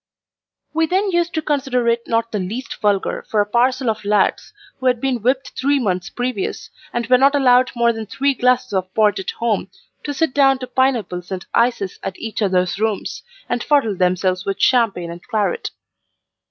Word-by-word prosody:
We 320 Hz, 0 st, +2 dB
then 385 Hz, +4 st, +1 dB
used 345 Hz, -1 st, 0 dB
to 315 Hz, -, -1 dB
consider 270 Hz, -5 st, 0 dB
it 235 Hz, 0 st, +1 dB
not 230 Hz, 0 st, 0 dB
the 210 Hz, -, -2 dB
least 225 Hz, +9 st, -5 dB
vulgar 205 Hz, -2 st, 0 dB
for 215 Hz, -, +1 dB
a 205 Hz, -, +3 dB
parcel 250 Hz, +4 st, +1 dB
of 220 Hz, -1 st, -1 dB
lads 205 Hz, 0 st, +1 dB, 0.3 s
who 260 Hz, -, -1 dB
had 250 Hz, -2 st, +2 dB
been 255 Hz, -2 st, -1 dB
whipped 260 Hz, +4 st, 0 dB
three 280 Hz, +2 st, +1 dB
months 185 Hz, -5 st, -1 dB
previous, 245 Hz, -5 st, -4 dB, 0.2 s
and 240 Hz, -1 st, -2 dB
were 250 Hz, +1 st, +4 dB
not 275 Hz, +2 st, +4 dB
allowed 255 Hz, -2 st, +4 dB
more 235 Hz, 0 st, +3 dB
than 225 Hz, -1 st, -6 dB
three 275 Hz, +6 st, 0 dB
glasses 250 Hz, -1 st, +1 dB
of 185 Hz, -1 st, -1 dB
port 210 Hz, -2 st, +3 dB
at 190 Hz, -, -4 dB
home, 230 Hz, -4 st, -1 dB, 0.3 s
to 290 Hz, -, -3 dB
sit 290 Hz, -1 st, 0 dB
down 270 Hz, -2 st, +4 dB
to 255 Hz, -, -6 dB
pineapples 235 Hz, -10 st, -1 dB
and 185 Hz, -1 st, -4 dB
ices 230 Hz, -5 st, +1 dB
at 190 Hz, -, -5 dB
each 225 Hz, 0 st, -5 dB
other's 185 Hz, -1 st, +1 dB
rooms, 220 Hz, -2 st, -2 dB, 0.3 s
and 240 Hz, -, -2 dB
fuddle 275 Hz, -9 st, +2 dB
themselves 185 Hz, 0 st, +1 dB
with 195 Hz, -1 st, -3 dB
champagne 210 Hz, -9 st, +2 dB
and 170 Hz, +1 st, -9 dB
claret. 220 Hz, -, -1 dB
235 Hz, 190 wpm, -20 LUFS, 205-260 Hz, 0.3 s, were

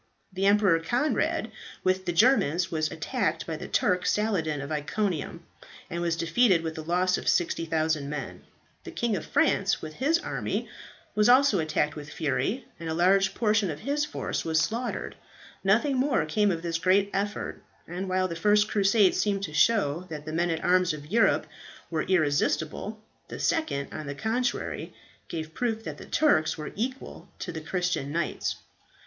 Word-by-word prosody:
The 190 Hz, +1 st, +1 dB
Emperor 200 Hz, -4 st, +4 dB
Conrad, 245 Hz, -, 0 dB, 0.3 s
with 185 Hz, 0 st, +1 dB
the -, -, 0 dB
Germans, 180 Hz, -, +3 dB
was 155 Hz, -1 st, 0 dB
attacked 165 Hz, -1 st, -2 dB
by 165 Hz, -, -4 dB
the -, -, -7 dB
Turk 180 Hz, 0 st, +1 dB
Saladin 180 Hz, -9 st, 0 dB
of 140 Hz, +2 st, -6 dB
Iconium, 170 Hz, +2 st, -2 dB, 0.5 s
and 170 Hz, +1 st, -3 dB
was 170 Hz, -1 st, 0 dB
defeated 170 Hz, +2 st, +3 dB
with 160 Hz, -1 st, -4 dB
a -, -, -3 dB
loss 180 Hz, +3 st, +1 dB
of -, -, -9 dB
60,000 160 Hz, -3 st, 0 dB
men. 150 Hz, 0 st, -5 dB, 0.4 s
The -, -, -8 dB
King 235 Hz, -3 st, -1 dB
of 170 Hz, -, -5 dB
France, 195 Hz, 0 st, +2 dB
with 155 Hz, 0 st, -7 dB
his 290 Hz, -, +2 dB
army, -, -, -3 dB, 0.5 s
was 210 Hz, +2 st, +3 dB
also 255 Hz, -5 st, +5 dB
attacked 155 Hz, -1 st, 0 dB
with 150 Hz, -1 st, -8 dB
fury, 150 Hz, -, -1 dB
and 165 Hz, -1 st, -5 dB
a 160 Hz, -, -1 dB
large 195 Hz, +3 st, +3 dB
portion 215 Hz, -3 st, +2 dB
of 150 Hz, -1 st, -5 dB
his 290 Hz, +1 st, 0 dB
force 300 Hz, -, -3 dB
were 160 Hz, -1 st, -2 dB
slaughtered. 225 Hz, +11 st, -1 dB, 0.5 s
Nothing 235 Hz, +8 st, +3 dB
more 255 Hz, -, +2 dB
came 205 Hz, +6 st, +2 dB
of 170 Hz, -3 st, -2 dB
this 165 Hz, -1 st, -1 dB
great 195 Hz, +3 st, +3 dB
effort, 205 Hz, +1 st, -3 dB, 0.3 s
and 180 Hz, +3 st, -4 dB
while 185 Hz, 0 st, +1 dB
the 170 Hz, -, -5 dB
first 210 Hz, +4 st, +3 dB
Crusade 200 Hz, -1 st, +4 dB
seemed 200 Hz, -2 st, 0 dB
to 155 Hz, -, -4 dB
show 180 Hz, -3 st, +2 dB
that 150 Hz, -2 st, -7 dB
the 155 Hz, -, -5 dB
men 170 Hz, +2 st, +1 dB
at 165 Hz, -1 st, -2 dB
arms 180 Hz, -2 st, +3 dB
of 150 Hz, 0 st, -9 dB
Europe 230 Hz, +1 st, +3 dB, 0.5 s
were 160 Hz, -2 st, 0 dB
irresistible, 160 Hz, +4 st, 0 dB, 0.3 s
the -, -, -7 dB
second 230 Hz, -, -1 dB
on 155 Hz, -1 st, -6 dB
the 140 Hz, -, -4 dB
contrary 235 Hz, -, -2 dB, 0.3 s
gave 160 Hz, -1 st, -5 dB
proof 225 Hz, +1 st, -2 dB
that -, -, -7 dB
the -, -, -10 dB
Turks 160 Hz, -, +2 dB
were 150 Hz, -, -6 dB
equal 255 Hz, +5 st, -5 dB
to -, -, -5 dB
the 160 Hz, -1 st, -6 dB
Christian 175 Hz, -3 st, -2 dB
knights. 165 Hz, 0 st, -2 dB
180 Hz, 175 wpm, -27 LUFS, 160-210 Hz, 0.5 s, also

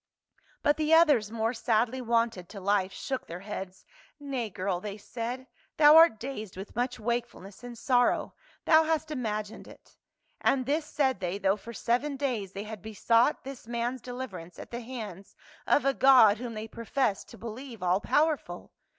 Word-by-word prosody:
But 290 Hz, 0 st, +3 dB
the 310 Hz, +1 st, +4 dB
others, 290 Hz, -11 st, +4 dB
more 225 Hz, +1 st, -1 dB
sadly 235 Hz, +2 st, 0 dB
wonted 230 Hz, -6 st, 0 dB
to 205 Hz, -, -8 dB
life, 195 Hz, 0 st, +1 dB
shook 265 Hz, +4 st, -5 dB
their 170 Hz, +2 st, -7 dB
heads. 195 Hz, -2 st, -7 dB, 0.3 s
"Nay, 270 Hz, -6 st, -3 dB
girl," 185 Hz, -1 st, -3 dB
they 205 Hz, 0 st, -6 dB
said, 240 Hz, +4 st, -5 dB, 0.3 s
"thou 300 Hz, 0 st, +8 dB
art 325 Hz, -9 st, +7 dB
dazed 220 Hz, -7 st, -6 dB
with 195 Hz, +2 st, -8 dB
much 245 Hz, +1 st, -2 dB
wakefulness 235 Hz, -3 st, -4 dB
and 245 Hz, -1 st, -8 dB
sorrow; 245 Hz, +1 st, +2 dB, 0.3 s
thou 315 Hz, -1 st, +6 dB
hast 315 Hz, -1 st, -1 dB
imagined 215 Hz, -6 st, -4 dB
it." -, -, -17 dB, 0.4 s
And 260 Hz, -2 st, +1 dB
this 300 Hz, +3 st, -1 dB
said 265 Hz, -5 st, 0 dB
they, 180 Hz, +1 st, -2 dB
though 195 Hz, 0 st, +2 dB
for 220 Hz, +2 st, -10 dB
seven 260 Hz, +6 st, -1 dB
days 235 Hz, -9 st, -2 dB
they 200 Hz, -, -5 dB
had 215 Hz, -2 st, -8 dB
besought 230 Hz, -, +2 dB
this 270 Hz, -4 st, -9 dB
man's 240 Hz, +1 st, -2 dB
deliverance 210 Hz, -9 st, -7 dB
at -, -, -10 dB
the 240 Hz, +1 st, -5 dB
hands 215 Hz, -6 st, -8 dB, 0.3 s
of 290 Hz, -, +3 dB
a 275 Hz, -, +3 dB
God 250 Hz, -7 st, +6 dB
whom 240 Hz, -2 st, -6 dB
they 215 Hz, +1 st, -5 dB
professed 230 Hz, -1 st, -2 dB
to -, -, -12 dB
believe 230 Hz, -1 st, -8 dB
all 180 Hz, +2 st, +2 dB
powerful. 305 Hz, +3 st, 0 dB
235 Hz, 170 wpm, -28 LUFS, 210-265 Hz, 0.4 s, thou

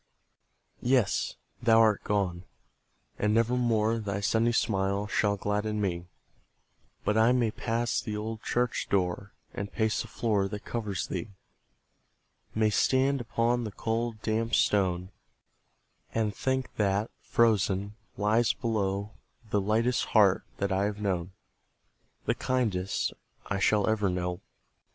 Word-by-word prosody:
Yes, 125 Hz, -3 st, +1 dB, 0.3 s
thou 115 Hz, -1 st, +5 dB
art 110 Hz, -2 st, +4 dB
gone! 95 Hz, -4 st, -1 dB, 0.8 s
and 105 Hz, +1 st, +2 dB
never 115 Hz, +1 st, +3 dB
more 115 Hz, -2 st, +2 dB
Thy 100 Hz, -2 st, -3 dB
sunny 115 Hz, +3 st, +2 dB
smile 100 Hz, -3 st, 0 dB
shall 100 Hz, 0 st, +1 dB
gladden 105 Hz, +2 st, -1 dB
me; 90 Hz, -3 st, -2 dB, 1.0 s
But 105 Hz, +1 st, +2 dB
I 115 Hz, +2 st, +5 dB
may 120 Hz, -3 st, +2 dB
pass 115 Hz, +1 st, -1 dB
the 105 Hz, -1 st, -4 dB
old 110 Hz, +1 st, -4 dB
church 125 Hz, 0 st, -1 dB
door, 95 Hz, +1 st, 0 dB, 0.2 s
And 100 Hz, +1 st, -5 dB
pace 110 Hz, -2 st, 0 dB
the -, -, -7 dB
floor 105 Hz, -4 st, 0 dB
that 105 Hz, +1 st, -7 dB
covers 105 Hz, -4 st, -3 dB
thee, 115 Hz, -, -4 dB, 1.3 s
May 110 Hz, -1 st, +3 dB
stand 135 Hz, +4 st, +2 dB
upon 120 Hz, +1 st, 0 dB
the 110 Hz, -, -4 dB
cold, 115 Hz, +1 st, -2 dB
damp 115 Hz, +1 st, 0 dB
stone, 95 Hz, -2 st, +1 dB, 1.0 s
And 110 Hz, -3 st, 0 dB
think 130 Hz, +2 st, -1 dB
that, 105 Hz, +1 st, +1 dB
frozen, 100 Hz, -3 st, +2 dB, 0.2 s
lies 110 Hz, +3 st, +3 dB
below 100 Hz, -3 st, -1 dB, 0.4 s
The 105 Hz, -, +2 dB
lightest 115 Hz, +5 st, +1 dB
heart 100 Hz, -4 st, +4 dB, 0.2 s
that 100 Hz, 0 st, -1 dB
I 95 Hz, +1 st, +2 dB
have 105 Hz, 0 st, -3 dB
known, 95 Hz, -3 st, -1 dB, 0.9 s
The -, -, +2 dB
kindest 105 Hz, -7 st, -1 dB, 0.3 s
I 100 Hz, -, -2 dB
shall 105 Hz, +1 st, +3 dB
ever 105 Hz, -3 st, +2 dB
know. 90 Hz, 0 st, -2 dB
105 Hz, 130 wpm, -29 LUFS, 100-115 Hz, 1.3 s, thou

